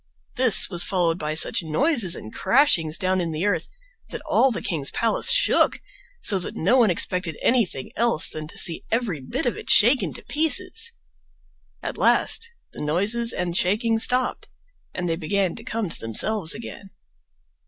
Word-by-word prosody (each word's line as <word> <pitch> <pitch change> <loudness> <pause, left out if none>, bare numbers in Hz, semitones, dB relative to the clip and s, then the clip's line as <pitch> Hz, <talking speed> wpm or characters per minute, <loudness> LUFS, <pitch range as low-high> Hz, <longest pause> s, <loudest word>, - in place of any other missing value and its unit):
This 250 -5 +5
was 175 -3 +2
followed 175 -2 0
by 155 0 -3
such 160 - +3
noises 195 - +1
and 110 - -10
crashings 180 - +2
down 185 0 -1
in 170 -2 -3
the 160 +5 -3
earth 180 -6 -1 0.4
that - - -8
all 270 - +3
the 235 - -5
king's 150 -6 -1
palace 230 - -1
shook, - - +2 0.4
so 195 - +2
that 175 - -8
no 190 +10 +1
one 230 -4 +4
expected 175 -2 0
anything 210 - -1
else 230 -8 +1
than 155 -1 -7
to - - -10
see 165 - +3
every 225 -9 -2
bit 130 - -4
of 245 - -1
it - - -10
shaken 245 +5 +4
to - - -8
pieces. 370 +9 +1 0.9
At - - -5
last 465 - +1 0.2
the - - -7
noises 205 +10 +1
and 180 -4 -3
shaking 225 +5 0
stopped, 250 +2 +1 0.4
and 180 -1 -4
they 165 -1 -2
began 185 +2 -1
to - - -10
come 220 -4 -4
to - - -9
themselves 160 - 0
again. 215 -3 -9
195 Hz, 170 wpm, -22 LUFS, 165-235 Hz, 0.9 s, This